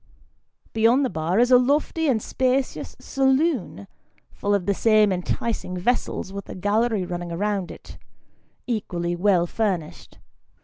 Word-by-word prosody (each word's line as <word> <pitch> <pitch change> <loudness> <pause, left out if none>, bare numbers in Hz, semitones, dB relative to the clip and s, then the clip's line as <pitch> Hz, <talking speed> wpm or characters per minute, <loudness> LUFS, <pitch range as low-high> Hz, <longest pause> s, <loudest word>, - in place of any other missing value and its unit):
Beyond 230 +5 +3
the 255 - -2
bar 160 +4 -1
is 245 +1 +3
a 250 - +8
lofty 295 +5 +1
and 250 -6 +2
spacious 260 0 -1
saloon, 265 - 0 0.5
full 205 0 0
of 190 -3 -1
the 200 - +2
same 215 0 +4
enticing 180 +1 -3
vessels, 195 -1 -1
with 200 -1 -7
a - - -6
gallery 205 +1 0
running 175 -1 -5
round 195 +1 -2
it, - - -12 0.7
equally 175 -7 -2
well 180 -1 +3
furnished. 180 -5 -3
210 Hz, 135 wpm, -23 LUFS, 180-245 Hz, 0.7 s, a